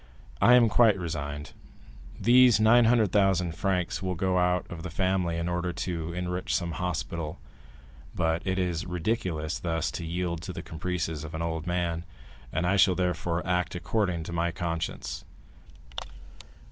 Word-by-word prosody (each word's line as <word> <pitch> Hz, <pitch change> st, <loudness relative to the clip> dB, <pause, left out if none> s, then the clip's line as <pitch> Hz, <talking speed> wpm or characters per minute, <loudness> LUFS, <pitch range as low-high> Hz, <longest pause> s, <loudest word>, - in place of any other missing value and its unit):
I 125 Hz, -, +7 dB
am 120 Hz, -2 st, +6 dB
quite 110 Hz, -2 st, +5 dB
resigned. 75 Hz, -4 st, -4 dB, 0.7 s
These 125 Hz, -1 st, +6 dB
900,000 110 Hz, -6 st, +4 dB
francs 90 Hz, +1 st, -1 dB
will 95 Hz, -1 st, -2 dB
go 90 Hz, +1 st, +1 dB
out 90 Hz, 0 st, +1 dB
of 85 Hz, -2 st, -8 dB
the 90 Hz, -, -5 dB
family 95 Hz, -1 st, 0 dB
in 85 Hz, +1 st, -2 dB
order 90 Hz, 0 st, -1 dB
to 85 Hz, -2 st, -3 dB
enrich 90 Hz, +1 st, -2 dB
some 85 Hz, -2 st, -1 dB
hospital; 85 Hz, -3 st, -3 dB, 0.8 s
but 80 Hz, -1 st, +1 dB
it 95 Hz, -1 st, -1 dB
is 90 Hz, -2 st, -1 dB
ridiculous 90 Hz, -4 st, -2 dB
thus 80 Hz, -2 st, -1 dB
to 85 Hz, -, -5 dB
yield 85 Hz, 0 st, -2 dB
to 90 Hz, -, -6 dB
the 85 Hz, -1 st, -6 dB
caprices 80 Hz, -2 st, -3 dB
of 80 Hz, +1 st, -7 dB
an 80 Hz, -, -2 dB
old 80 Hz, 0 st, -3 dB
man, 85 Hz, -1 st, -1 dB, 0.5 s
and 85 Hz, -, -1 dB
I 95 Hz, +3 st, +2 dB
shall, 95 Hz, -1 st, +5 dB
therefore, 90 Hz, -1 st, -1 dB
act 90 Hz, -1 st, 0 dB
according 90 Hz, -2 st, -1 dB
to 85 Hz, -, -7 dB
my 85 Hz, 0 st, +1 dB
conscience." 80 Hz, -7 st, -4 dB
90 Hz, 150 wpm, -28 LUFS, 85-95 Hz, 0.8 s, I